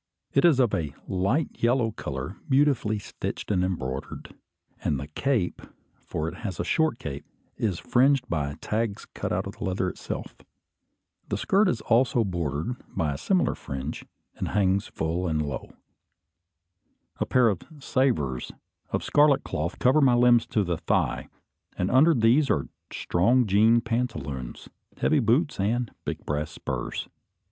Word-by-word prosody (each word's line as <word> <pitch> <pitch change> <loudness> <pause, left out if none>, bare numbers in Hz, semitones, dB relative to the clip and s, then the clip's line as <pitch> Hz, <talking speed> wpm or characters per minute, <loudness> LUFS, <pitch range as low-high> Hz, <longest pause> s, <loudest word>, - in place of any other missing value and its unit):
It - - +4
is 155 -6 +5
of 120 -5 +3
a 75 -7 -2
light 100 - 0
yellow 120 -1 +2
colour, 70 -4 -5
beautifully 135 -6 +3
stitched 105 - -5
and 90 -3 +2
embroidered; 70 -8 -4 0.5
and 70 - 0
the 70 - -5
cape, 100 - -1 0.4
for 80 - -4
it 85 +2 -6
has 95 -7 -5
a - - +1
short 160 -7 +1
cape, 70 - -6 0.3
is 100 -6 -1
fringed 130 +4 +3
by 70 -3 -2
tags 110 -1 -2
cut - - -5
out - - 0
of - - -8
the - - -6
leather 95 0 0
itself. - - -6 0.9
The - - -1
skirt 195 +1 +3
is 115 - -1
also 120 0 +3
bordered 85 - -2
by 75 -3 -1
a - - -5
similar 185 -3 +2
fringe, 70 +1 -6 0.3
and - - -2
hangs 100 0 +1
full 85 +3 -2
and 80 -2 0
low. 75 -2 -4 1.5
A - - +1
pair 125 -2 +4
of 100 -5 0 0.2
"savers" 115 - 0 0.4
of - - -1
scarlet 145 -2 +4
cloth 80 +4 -3
cover 130 +5 +4
my 130 -3 +5
limbs 120 -1 +5
to 105 - +1
the 85 -3 -1
thigh; - - 0 0.5
and 90 - 0
under 150 +6 +6
these 125 +5 +4
are 70 - +1 0.2
strong 120 +9 +2
jean 110 +4 +4
pantaloons, 80 - -3 0.3
heavy 155 - +3
boots, 125 - +2
and 115 +3 0
big - - -4
brass 75 +1 -2
spurs. - - -4
105 Hz, 155 wpm, -26 LUFS, 80-125 Hz, 1.5 s, under